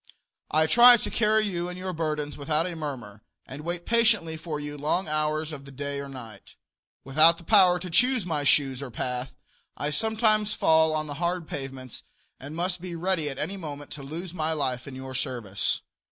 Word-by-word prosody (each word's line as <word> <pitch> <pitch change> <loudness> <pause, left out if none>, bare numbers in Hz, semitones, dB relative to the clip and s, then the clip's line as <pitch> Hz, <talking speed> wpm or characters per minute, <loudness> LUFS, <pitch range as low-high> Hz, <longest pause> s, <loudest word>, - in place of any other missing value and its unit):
I 155 +1 +3
try 240 +7 +8
to - - -4
carry 215 0 +2
you 175 -3 -2
and 180 - -7
your 185 0 -4
burdens 150 -3 -2
without 150 +2 0
a 180 -2 -4
murmur, 125 -10 -6 0.2
and 135 +3 -8
wait 175 +2 -4
patiently 225 -8 +2
for 155 -1 -5
you 145 0 -5
long 150 +6 -1
hours 155 +1 -1
of 140 -3 -8
the 140 - -12
day 140 +1 -4
or 140 0 -6
night. 115 -6 -11 0.5
Without 155 +5 +5
the 170 - -13
power 185 -2 +5
to 180 +1 -7
choose 250 +2 +3
my 155 -4 -1
shoes 135 -2 +2
or 140 - -5
path, 125 +2 -4 0.5
I 145 +1 -2
sometimes 220 +1 +1
fall 160 0 +4
on 155 0 -1
the 145 - -6
hard 175 -1 -1
pavements, 135 -3 -6 0.4
and 145 +3 -8
I 170 - -2
must 180 -1 -2
be 180 -1 -6
ready 165 -3 0
at 135 - -5
any 200 +7 -3
moment 145 -5 -8
to 150 - -7
lose 165 +6 -7
my 160 -2 -1
life 130 -4 -2
in 135 - -8
your 130 0 -7
service. 120 -7 -2
155 Hz, 200 wpm, -27 LUFS, 140-180 Hz, 0.5 s, try